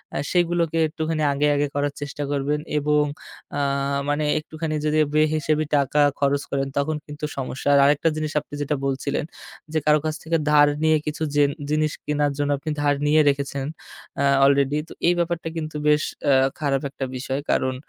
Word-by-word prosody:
আ - - 0
সেগুলোকে 170 -2 +1
একটুখানি 160 0 -2
আগে, 145 +1 +1
আগে 145 +1 +1
করার 145 0 0
চেষ্টা 145 0 -4
করবেন 145 +1 0 0.2
এবং 150 0 +2 0.5
আ - - 0 0.5
মানে 145 +1 0 0.2
একটুখানি 155 0 -4
যদি 155 +1 +1 0.2
বেহিসাবি 155 0 +2
টাকা 145 +1 +2 0.2
খরচ 140 0 +2
করেন 135 0 0
তখন 150 +2 0
কিন্তু 150 0 -6
সমস্যা। 130 +1 -3
আর - - +6
আরেকটা 145 +3 +3
জিনিস 155 -1 -2
আপনি 150 - -16
যেটা 145 +1 0
বলছিলেন, 140 +2 -1 0.5
যে 155 - +2
কারো 150 0 +5
কাছ 155 -1 -1
থেকে 165 +1 +1
ধার 145 -1 +6 0.2
নিয়ে 155 0 +4
কিছু 150 +1 -3
জে 145 - +5 0.3
জিনিস 155 0 +1
কেনার 145 -1 +1
জন্য 145 0 0
আপনি 155 +3 -4
ধার 145 -1 +2
নিয়ে 155 +1 +5
রেখেছেন 140 -1 -2 0.6
আ - - +2 0.2
অলরেডি। 140 +1 +3
তো - - -9
এই 175 - +5
ব্যাপারটা 170 -1 -1
কিন্তু 155 -1 -5
বেশ 150 0 +4 0.3
আ - - +6 0.3
খারাপ 140 -3 0
একটা 135 -1 -5
বিষয়। 130 +1 -3
কারণ 130 0 +1
150 Hz, 180 wpm, -23 LUFS, 140-155 Hz, 0.6 s, আর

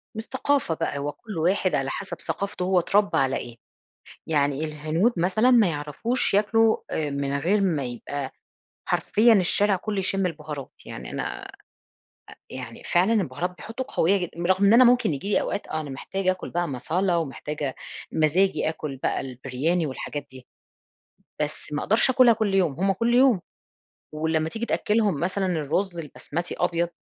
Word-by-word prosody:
من 220 - -4
الثقافة 265 -5 0
بقى، 145 - -2
هو 145 +1 -2
كل 210 -1 -9
واحد 185 +3 +1
على 135 0 -1
حسب - - -5
ثقافتُه 200 -2 -3
هو 185 0 +3
اتربّى 200 +4 +2
على 135 0 +2
إيه، 120 -1 -8 0.7
يعني 145 -1 +1
الهنود 155 +9 0
مثلًا، 190 +8 +3
ما 230 -5 +6
يعرفوش 160 - -1
ياكلوا 220 +2 +3 0.3
من 140 0 -2
غير 195 +7 +2
ما 160 -8 +1
يبقى 130 +3 -5 0.6
حرفيًا 225 +2 +4
الشارع 200 +1 +4
كله 205 +2 -3
يشِمّ 195 0 0
البُهارات، 150 -5 -5
يعني 60 - -8
أنا - - -3 0.2
أ - - -10 1.0
يعني 125 -3 -8
فعلًا 180 +5 +2
البُهارات 180 - 0
بيحطوا 235 +4 -6
قوية 190 +5 +3
جد 180 -3 -3 0.2
رغم 190 +2 +3
إن 200 - +6
أنا 255 +2 +8
ممكن 245 -8 +4
ييجي 145 +8 -4
لي - - +3
أوقات - - -3
آه 155 - -2
أنا 150 -2 -6
محتاجة 185 +8 -2
أكل 185 0 -5
بقى 175 0 -1
Masala 185 +7 0
ومحتاجة 150 -3 -3 0.4
مزاجي 160 +4 +2
آكل 155 -4 -5
بقى - - -1
البرياني 135 +6 -2
والحاجات 145 +1 -5
دي، 130 -1 -12 1.0
بس 150 0 -4
ما 150 - -1
أقدرش 220 +5 +3
آكُلها 250 -2 +6
كل 215 -3 -1
يوم، 180 -7 +2
هم 195 +1 +3
كل 230 +5 0
يوم، 245 -6 +5 0.7
ولمَّا 160 +1 0
تيجي 225 +6 -4
تأكِّلهم 210 -9 +1
مثلًا 190 +2 -1
الرز 175 +2 -1
البسمتي 165 +2 -4
أبيض، 170 -1 +1
175 Hz, 160 wpm, -25 LUFS, 150-200 Hz, 1.0 s, أنا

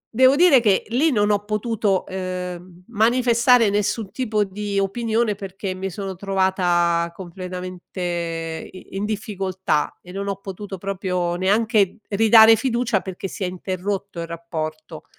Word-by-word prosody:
devo 260 +3 +6
dire 325 -8 +6
che 205 -4 +3
lì 285 +7 +2
non 210 -3 +2
ho 205 0 +1
potuto, 210 -2 0
ehm, 180 -1 -6
manifestare 235 +1 +4
nessun 205 +1 -1
tipo 215 -4 0
di 200 +1 -3
opinione 220 +2 0
perché 195 -1 -5
mi 190 +1 -4
sono 195 +1 -5
trovata 175 -3 +1
completamente 175 -2 -5
i 185 - -12
in 195 - -2
difficoltà 190 -6 -2
e 180 - -12
non 200 +1 -4
ho 195 - -2
potuto 195 0 -7
proprio 180 -2 -2
neanche 205 +1 +2
ridare 220 +2 +7
fiducia 235 -3 0
perché 190 0 -6
si 195 +1 -6
è - - 0
interrotto 185 0 -4
il 165 - -5
rapporto. 160 -2 -6
195 Hz, 140 wpm, -22 LUFS, 180-215 Hz, -, ridare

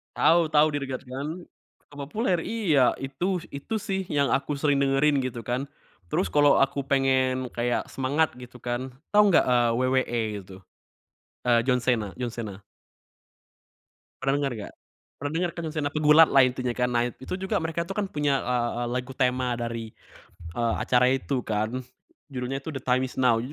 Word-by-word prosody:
Tahu,e 170 0 +4
tahu 155 0 +4
Dear 145 -2 -3
God 130 -1 -5
kan? 135 +3 -4 0.6
Terpopuler? 170 - -1
Iya, 165 - +2
itu. 170 +7 -3
Itu 140 +11 -5
sih 190 -3 -2
yang 140 -2 +1
aku 140 +2 0
sering 140 -1 +1
dengerin, 140 +1 +3
gitu 125 -3 -4
kan. 125 +5 -2 0.4
Terus 85 +1 -1
kalo 145 -1 +5
aku 135 0 -2
pengen 130 -2 +1
kayak 120 0 -1
semangat, 140 +4 +1
gitu 125 0 -12
kan. 125 +1 -3 0.2
Tau 210 0 +6
nggak, 190 - +5
eee, 120 -2 +3
WWE 130 -1 +1 0.2
gitu? 95 -1 -12 0.9
Eee, 120 -1 +4
John 125 0 +2
Cena, 115 -5 0
John 125 - -1
Cena. 110 -5 -6 1.6
Pernah 135 0 +1
denger 140 -1 -1
nggak? 105 -2 -8 0.4
Pernah 145 0 -4
denger 175 +2 0
kan 170 - -4
John 155 - -6
Cena, 145 -2 0
pegulat 155 +1 +6
lah, 135 - +6
intinya 125 -1 0
kan. 125 0 +1
Nah, 120 -1 +2
itu 130 - -8
juga 190 +3 -2
mereka 165 +1 -2
tuh 195 - -5
kan 210 - 0
punya, 145 -5 0
eee, 120 -1 0
eee, - - -2
lagu 125 +1 -8
tema 125 -1 +1
dari, 115 -2 -5 0.6
eee, 115 -1 0
acara 125 +1 +3
itu 135 0 -1
kan, 110 +4 -2 0.5
judulnya 130 0 -3
tuh 155 +1 -6
The - - -17
Time 130 0 +2
is 125 - -11
Now. 125 -3 +4
130 Hz, 175 wpm, -26 LUFS, 125-150 Hz, 1.6 s, Tau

